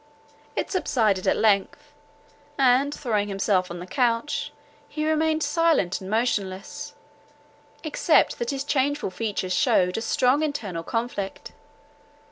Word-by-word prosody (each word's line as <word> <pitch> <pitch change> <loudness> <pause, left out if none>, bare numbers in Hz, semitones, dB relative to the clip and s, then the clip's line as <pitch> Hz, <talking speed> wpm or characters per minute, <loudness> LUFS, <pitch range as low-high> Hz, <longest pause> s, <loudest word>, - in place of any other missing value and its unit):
It - - -2
subsided 220 - +1
at - - +3
length; 225 +8 +1 0.6
and, 270 +1 +4
throwing 220 -8 -1
himself 195 -2 0
on 175 - -6
the 175 - -7
couch, 240 +5 0 0.4
he 305 0 -3
remained 315 0 +1
silent 295 - +1
and 190 - -7
motionless, 220 +4 -2 0.9
except 310 +1 +2
that 240 - -2
his 275 -1 -2
changeful 285 -5 0
features 200 -3 -2
shewed 180 +2 +2
a - - -6
strong 255 +5 +2
internal 220 - -3
conflict. 230 0 -4
235 Hz, 120 wpm, -25 LUFS, 195-290 Hz, 0.9 s, and